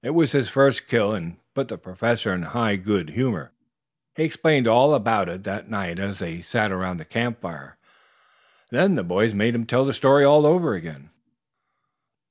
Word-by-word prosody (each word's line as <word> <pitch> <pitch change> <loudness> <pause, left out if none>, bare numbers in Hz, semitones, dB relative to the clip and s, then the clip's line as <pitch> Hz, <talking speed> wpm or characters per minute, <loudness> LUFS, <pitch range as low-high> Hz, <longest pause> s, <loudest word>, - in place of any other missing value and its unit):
It 145 +6 -3
was 165 -3 +3
his 140 -3 0
first 135 -2 +2
kill 110 -3 +1
and 85 -4 -7 0.2
put - - -3
the - - -9
Professor 110 +4 -2
in 90 - -4
high 110 +5 -1
good 95 -4 -2
humor. 115 - -3 0.6
He 155 - -1
explained 155 -5 +2
all 130 +6 +5
about 110 -8 0
it 95 +3 -9
that 100 +3 -7
night 95 -6 -5
as 100 0 -5
they 85 -3 -8
sat 105 +3 -1
around 90 -1 -4
the 80 - -12
camp 115 0 -3
fire. 75 -7 -11 0.9
Then 190 0 +3
the - - -2
boys 100 +5 0
made 110 +4 +1
him 115 -1 -3
tell 125 +3 +2
the 140 - -1
story 140 +1 +5
over 150 +3 +5
again. 80 -4 -10
110 Hz, 180 wpm, -22 LUFS, 90-135 Hz, 0.9 s, all